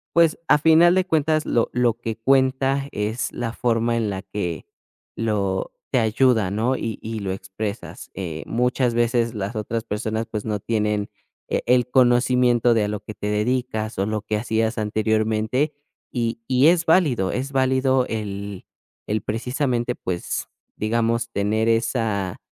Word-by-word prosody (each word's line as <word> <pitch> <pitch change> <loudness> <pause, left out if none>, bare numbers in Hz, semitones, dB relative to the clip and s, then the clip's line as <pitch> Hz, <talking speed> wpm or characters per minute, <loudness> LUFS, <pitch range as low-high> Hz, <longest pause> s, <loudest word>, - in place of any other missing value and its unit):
pues, 165 -2 +4
a - - +7
final 160 +3 +5
de 185 -1 +2
cuentas, 155 -3 +1
lo 115 - +1
lo 125 -1 +2
que 115 -1 -5
cuenta 135 +2 +2
es 110 +3 -2
la 115 -2 -4
forma 115 -1 +1
en 115 -3 0
la 95 -1 -4
que 95 -4 -4 0.5
lo 100 -4 -1 0.2
te 130 - +2
ayuda, 110 -2 +2
¿no?, 115 +6 +1
y 115 -3 -4
y 110 0 -4
lo 100 -2 -3
expresas, 95 +3 -6
eh, 85 -4 -5
muchas 125 +1 +1
veces 120 0 +1
las 105 +1 -4
otras 110 +2 -3
personas, 110 +1 -2
pues, 105 -2 -4
no 105 -2 -2
tienen, 105 -2 -1 0.4
eh, - - 0
el 125 0 +3
conocimiento 125 -1 +4
de 110 - +2
a - - -2
lo 105 -1 -3
que 110 - -8
te 105 - -5
dedicas, 110 0 -1
o 95 - +2
lo 110 0 -2
que 105 0 -2
hacías 110 0 -1
anteriormente. 110 +5 0 0.4
Y 115 -2 -2
y 130 +4 +4
es 170 0 +4
válido. 145 - +3
Es 135 +2 -3
válido 130 -1 +2
el 100 -3 -5 0.4
el 105 0 -1
precisamente, 125 +2 -1
pues, 90 -2 -4 0.3
digamos 115 +1 0
tener 110 +2 +1
esa 115 -5 0
115 Hz, 155 wpm, -23 LUFS, 105-125 Hz, 0.5 s, a